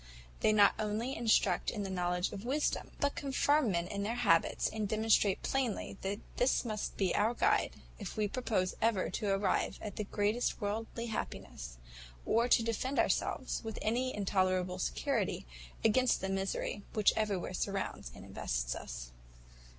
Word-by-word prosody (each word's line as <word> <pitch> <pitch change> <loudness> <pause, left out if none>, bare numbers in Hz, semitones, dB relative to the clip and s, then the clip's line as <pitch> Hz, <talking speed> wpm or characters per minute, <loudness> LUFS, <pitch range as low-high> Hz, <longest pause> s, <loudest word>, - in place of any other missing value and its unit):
They - - +4
not 205 -2 +6
only 215 +5 -1
instruct 220 -5 +3
in 210 -3 -3
the 195 - -4
knowledge 180 0 0
of 200 0 -6
Wisdom, 280 +5 0
but 285 0 +1
confirm 285 -1 +2
men 170 -2 0
in 200 +1 -3
her 230 +3 -1
habits, 200 -9 +3
and 215 -2 -2
demonstrate 215 -2 +3
plainly, 260 -8 -1
that 200 +2 -2 0.2
this 250 +1 +2
must 215 -2 -3
be 190 -3 +1
our 225 +3 +2
guide, - - +2 0.2
if 200 -1 -6
we 210 -1 +2
propose 205 -5 0
ever 220 -5 +2
to 205 - -2
arrive 195 +1 +1
at 205 -3 -7
the 215 - -1
greatest 210 +4 0
worldly 225 +2 -3
happiness, 60 - -5 0.5
or 235 +2 +3
to 235 - +5
defend 230 +4 -1
ourselves, - - 0
with 225 -1 -5
any 250 +4 +1
tolerable 185 -1 +1
security, 195 -7 -1 0.4
against 250 +3 +4
the 190 - -3
misery 195 +1 -2
which 215 -2 +4
everywhere 200 -4 -1
surrounds 195 - -3
and - - -11
invests - - -2
us. - - -7
210 Hz, 160 wpm, -33 LUFS, 190-230 Hz, 0.5 s, not